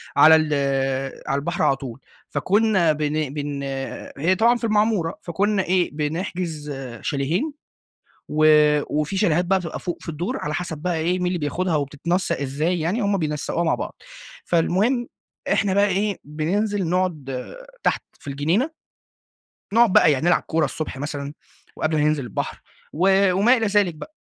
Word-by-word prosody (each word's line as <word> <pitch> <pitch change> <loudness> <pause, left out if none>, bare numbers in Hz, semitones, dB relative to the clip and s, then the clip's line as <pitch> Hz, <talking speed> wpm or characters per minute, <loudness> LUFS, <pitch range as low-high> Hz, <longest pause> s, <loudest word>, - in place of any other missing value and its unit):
على 155 +3 +8
ال 155 -1 +1 0.8
على 140 -1 +1
البحر 170 +3 -2
على 145 -3 +4
طول. 130 -2 -8 0.3
فكنا 200 -4 +2
بن 150 -1 -2
بن 145 -1 -4 0.5
هي 170 +7 +2
طبعًا 235 +2 +5
في 240 - -14
المعمورة، 210 -6 +1
فكنا 195 +3 0
إيه، 180 0 +1
بنحجز 160 0 -3 0.3
شاليهين، 160 - -1 0.8
و 155 +1 +3 0.5
وفي 155 +6 -2
شاليهات 180 -3 +2
بقى 190 +2 +2
بتبقى 175 -3 -6
فوق 175 - -4
في - - -11
الدور، 175 - -3
على 150 +1 -3
حسب 165 -3 -3
بقى 175 +2 -1
إيه، 170 +3 0
مين 180 - -1
اللي 180 0 0
بياخدها 165 +3 -1
وبتتنسق 150 +6 -1
إزاي 150 +6 -1
يعني، 175 +9 0
هم 200 -1 +1
بينسقوها 155 +1 -1
مع 160 - +2
بعض. - - -5 0.5
فالمهم 205 +9 +1 0.4
إحنا 195 -2 +2
بقى 200 +1 +4
إيه، 200 +1 0
بننزل 185 +6 -1
نقعد 155 -8 -1 0.4
تحت - - +1 0.2
في 145 - -7
الجنينة، 165 - 0 1.0
نقعد 230 -2 +5
بقى 155 - +6
يا 135 - 0
نلعب 175 +2 +3
كورة 160 -1 0
الصبح 150 -1 -4
مثلًا 145 0 -4 0.4
وقبل 155 0 0
ما 150 - +2
ننزل 150 -3 +1
البحر 115 - -4 0.3
و 190 +3 +3
وما 215 +8 +4
إلى 225 - 0
ذلك 205 -4 +2
بقى. 300 - -11
170 Hz, 160 wpm, -23 LUFS, 150-195 Hz, 1.0 s, على